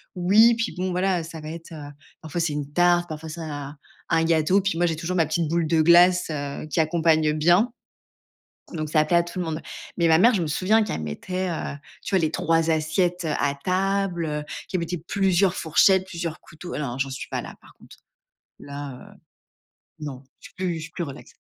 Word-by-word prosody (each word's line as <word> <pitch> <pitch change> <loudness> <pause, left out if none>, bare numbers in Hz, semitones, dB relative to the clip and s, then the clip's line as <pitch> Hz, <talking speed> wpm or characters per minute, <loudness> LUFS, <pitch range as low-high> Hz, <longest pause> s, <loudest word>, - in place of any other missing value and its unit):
oui, 210 +6 +5
puis 230 +1 -2
bon, 185 +1 -1
voilà, 180 -1 0
ça 160 0 -9
va 155 - -7
être, 165 +1 -9
heu, 145 -2 -8 0.3
parfois 160 +1 -5
c'est 165 -3 0
une 145 -1 -4
tarte, 175 +1 +3
parfois 155 0 -7
c'est 165 +2 -7
un 145 -2 -6 0.3
un 165 -1 +3
gâteau. 165 +4 +3
Puis 195 -3 -1
moi, 175 - +2
j'ai 165 -2 0
toujours 170 +3 -3
ma 165 -3 +3
petite 160 +1 -1
boule 170 +1 0
de 160 0 +3
glace, 175 +2 +6
heu, 145 0 -4
qui 160 - -2
accompagne 160 -1 +2
bien, 175 +9 +3 1.0
donc 155 -2 -3
ça 155 -1 +3
plaît 170 +3 +2
à 170 - +3
tout 170 +2 -8
le 180 - -1
monde, 160 0 -3 0.4
mais 170 - +3
ma 160 0 +5
mère, 235 +8 +6
je 195 - +1
me - - -1
souviens 195 +9 +2
qu'elle 200 - -3
mettait, 180 - -4
heu, 160 - -4 0.3
tu - - -4
vois? 190 - +4
Les 160 - +1
3 165 0 +1
assiettes 170 +3 0
à 140 0 +1
table, 190 -1 0
heu, 150 0 -3 0.3
qu'elle 185 - -1
mettait 170 +1 -3
plusieurs 190 +2 +1
fourchettes, 185 +4 +3
plusieurs 170 -3 -5
couteaux. 175 +3 -10
Ah - - -3
non, 150 - -2
hein, 125 - -6
j'en 135 0 -1
suis 135 - -6
pas - - -3
là, - - -9
par - - -19
contre. - - -17 0.6
Là, 140 -2 -8
heu, - - -24 0.8
non. 140 -3 -7 0.2
Je - - -12
suis - - -30
plus 185 -3 -2
je - - -6
suis - - -9
plus 175 - -4
relax. 140 -4 -9
165 Hz, 220 wpm, -24 LUFS, 155-180 Hz, 1.0 s, glace